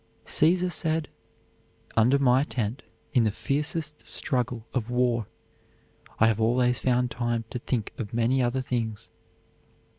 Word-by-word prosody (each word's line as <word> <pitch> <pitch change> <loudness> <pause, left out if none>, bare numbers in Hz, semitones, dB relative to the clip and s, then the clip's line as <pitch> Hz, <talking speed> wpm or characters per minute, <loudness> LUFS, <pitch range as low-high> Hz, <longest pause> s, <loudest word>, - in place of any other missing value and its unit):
Caesar 180 +3 +2
said: 160 -1 -1 0.9
"Under 120 +5 +5
my 130 -1 +4
tent 120 -4 -3 0.3
in 125 -4 +4
the 110 - +3
fiercest 150 +6 -2
struggle 125 -4 -1
of 120 -3 -2
war 125 -3 +1 0.9
I 115 - +5
have 110 -1 +2
always 125 +2 +2
found 125 -1 +1
time 120 -1 -1
to 125 - -3
think 120 -3 -2
of 105 -4 -4
many 120 +3 +2
other 125 +2 +1
things." 115 -4 -3
125 Hz, 130 wpm, -27 LUFS, 115-135 Hz, 0.9 s, Under